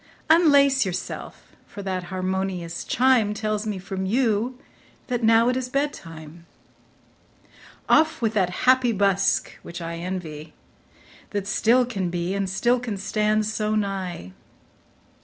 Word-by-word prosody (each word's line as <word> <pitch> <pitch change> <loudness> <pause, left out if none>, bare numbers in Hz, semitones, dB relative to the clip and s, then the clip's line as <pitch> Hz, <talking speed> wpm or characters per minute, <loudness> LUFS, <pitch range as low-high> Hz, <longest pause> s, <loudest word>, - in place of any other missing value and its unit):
Unlace 285 -5 +5
yourself, 185 -3 -6
for 200 - -9
that 185 -2 -3
harmonious 185 -2 -3
chime 240 -4 +3
Tells 215 0 -2
me 210 -2 -2
from 190 0 -4
you 235 +2 +1 0.5
that 245 -1 -1
now 225 +1 +5
it 250 - +2
is 255 -1 -3
bed 285 +3 0
time. 165 - -12 1.4
Off 320 0 +3
with 225 -2 0
that 190 -5 +2 0.2
happy 255 -2 +4
busk, 195 -1 +1
which 170 +1 -8
I 170 0 -5
envy, 165 -4 -6 0.8
That 200 - -2
still 230 +4 +3
can 195 -7 -3
be, 175 +1 -2
and 195 -1 -1
still 240 +6 +1
can 235 -5 -4
stand 215 +2 0
so 215 0 -1
nigh. 190 - -3
205 Hz, 135 wpm, -24 LUFS, 185-240 Hz, 1.4 s, Unlace